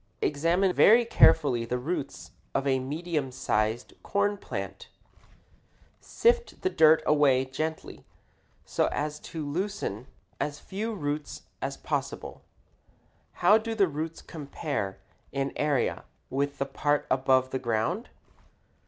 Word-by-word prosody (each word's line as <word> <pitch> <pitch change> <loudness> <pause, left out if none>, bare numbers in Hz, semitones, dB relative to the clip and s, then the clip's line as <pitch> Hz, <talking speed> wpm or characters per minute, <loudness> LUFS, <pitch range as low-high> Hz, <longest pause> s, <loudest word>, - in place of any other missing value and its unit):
Examine 170 +6 +2
very 230 +6 +6
carefully 140 - +5
the 120 +2 -2
roots 140 +2 -4 0.2
of 135 - +1
a 135 -1 +2
medium 150 +1 -3
sized 110 -1 -1
corn 205 0 +1
plant. 205 - -6 1.1
Sift 475 +1 +1
the 375 - +1
dirt 160 0 +5
away 140 -3 +4
gently 155 +5 -5 0.6
so - - +1
as 150 +1 -2
to 155 -1 -6
loosen 145 - -3 0.3
as 145 0 -2
few 215 +6 -4
roots 145 -3 -4 0.2
as - - -3
possible. - - -4 1.0
How 210 +5 +7
do 225 +1 -4
the 200 -3 +4
roots 160 +1 -5
compare 140 - -4 0.3
in 140 0 -2
area 145 -4 0 0.3
with 140 +1 -1
the 140 - -1
part 145 +1 0
above 130 0 +3
the 130 - -1
ground? 120 - -1
150 Hz, 120 wpm, -28 LUFS, 135-180 Hz, 1.1 s, How